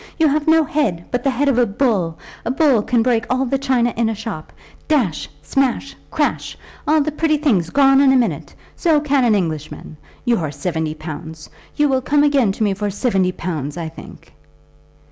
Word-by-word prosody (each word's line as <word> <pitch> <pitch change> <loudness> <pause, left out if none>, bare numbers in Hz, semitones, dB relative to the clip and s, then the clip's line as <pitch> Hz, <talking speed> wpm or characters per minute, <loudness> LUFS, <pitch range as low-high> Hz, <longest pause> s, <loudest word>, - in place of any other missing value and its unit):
You 320 - +4
have 295 +2 -1
no 320 0 +5
head, 225 - -1
but 245 0 -1
the 275 - +2
head 270 +3 0
of 260 -3 +2
a 245 - +3
bull. 200 -7 0 0.3
A - - -3
bull 265 -3 +3
can 235 +1 +1
break 235 -2 +1
all 255 +1 +1
the 270 +2 -1
china 255 -3 +1
in 230 -1 +1
a 225 - -2
shop, 205 -7 -7 0.4
dash, 250 - 0
smash, 275 0 -1
crash, - - -2 0.3
all 310 0 +4
the 305 +2 -1
pretty 310 0 +1
things 215 - +1
gone 270 -1 +4
in 275 -1 +5
a - - +4
minute! 225 - -1 0.2
So 320 -4 +2
can 285 -2 +1
an 225 -3 +3
Englishman. 155 -4 -4 0.3
Your 225 - +1
seventy 155 +2 -3
pounds! 155 0 -9 0.2
You 295 - +3
will 265 -2 +1
come 290 +2 +2
again 275 -8 +3
to 220 - -2
me 205 -2 +1
for 205 +1 -3
seventy 195 -3 0
pounds, 160 -5 -5
I 165 -2 -4
think." 160 - -14
240 Hz, 195 wpm, -19 LUFS, 180-275 Hz, 0.4 s, no